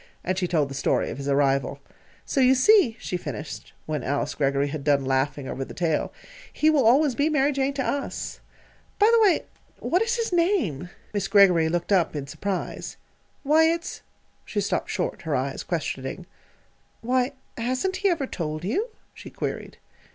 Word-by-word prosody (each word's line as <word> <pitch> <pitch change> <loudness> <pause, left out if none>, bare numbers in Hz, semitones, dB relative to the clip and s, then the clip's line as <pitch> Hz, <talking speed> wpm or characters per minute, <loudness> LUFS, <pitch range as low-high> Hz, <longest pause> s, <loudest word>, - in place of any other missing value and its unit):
And 185 - -1
she 185 -1 -1
told 160 -5 +1
the 135 - -8
story 135 - 0
of - - -7
his 140 - -5
arrival. 140 -1 +1 0.5
"So 275 - 0
you 260 +1 +6
see," 265 - +5
she 180 - -3
finished, 150 -4 -7
when 155 -3 -2
Alice 140 +1 -1
Greggory 140 0 +1
had 145 -1 -5
done 140 -2 +2
laughing 135 +1 0
over 135 - -4
the - - -10
tale, 165 -4 0 0.4
"he 310 +1 +3
always 275 0 +4
will - - -14
be 295 +2 +3
'Mary 295 -2 +2
Jane' 275 0 0
to 270 - -1
us. 280 -1 -3 0.6
By 420 - +5
the 460 - +5
way, 400 -5 +4 0.3
what 360 - 0
is 465 +1 +1
his 460 -5 -2
name?" 335 - +1 0.2
Miss 200 -2 -1
Greggory 185 -6 +5
looked 175 +3 -2
up 175 -5 +3
in 145 -2 -3
surprise. 195 +7 -4 0.5
"Why, 310 +3 +5
it's 335 +1 -1 0.2
" - - -40
She - - -3
stopped - - -1
short, - - -2
her - - -1
eyes - - -2
questioning. - - -4 0.8
"Why, 255 +3 +1 0.2
hasn't 255 +11 -1
he 400 - +2
ever 325 -6 0
told 155 -8 -4
you?" 385 - -1 0.2
she - - -11
queried. - - -5
205 Hz, 180 wpm, -25 LUFS, -, 0.8 s, you